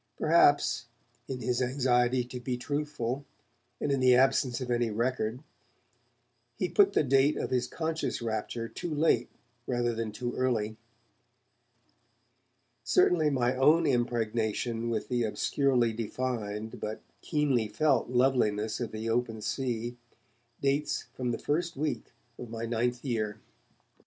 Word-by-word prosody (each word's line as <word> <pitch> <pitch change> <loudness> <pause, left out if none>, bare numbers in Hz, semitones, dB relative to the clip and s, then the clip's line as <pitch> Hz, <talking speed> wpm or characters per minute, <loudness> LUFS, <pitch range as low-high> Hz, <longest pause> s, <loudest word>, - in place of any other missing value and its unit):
Perhaps, - - +4 0.4
in 130 -2 -5
his 125 0 0
anxiety 125 -1 +2
to 125 +1 -7
be 125 0 -3
truthful, 145 -1 -3 0.6
and 145 - -1
in 135 - +1
the 130 -1 +6
absence 130 -1 +3
of 125 -2 -4
any 120 -1 +1
record, 115 +2 -1 1.1
he 185 - 0
put 200 -1 +4
the - - +3
date 135 +2 +3
of - - -3
this 125 -1 +1
conscious 160 +2 -2
rapture 115 0 -3
too 170 - -6
late 150 -6 +2 0.4
rather 120 -1 0
than 115 -1 -3
too 120 +3 -4
early. 115 -4 0 2.1
Certainly 160 -4 +3
my 125 -2 +1
own 155 +6 +4
impregnation 115 -1 0
with 110 -2 -2
the 125 -1 0
obscurely 120 +1 +1
defined 110 -2 -3
but 110 +1 -5 0.2
keenly 140 -8 +1
felt 135 +1 +1
loveliness 120 -4 +2
of 120 -3 -3
the 110 +1 -4
open 115 -1 0
sea 120 +1 -3 0.6
dates 140 +2 0
from 125 -1 -3
the 120 - -1
first 170 +2 -1
week 150 +2 -2 0.3
of 120 - -7
my 115 0 -4
ninth 120 +2 -1
year. 110 -4 -2
125 Hz, 130 wpm, -29 LUFS, 115-135 Hz, 2.1 s, the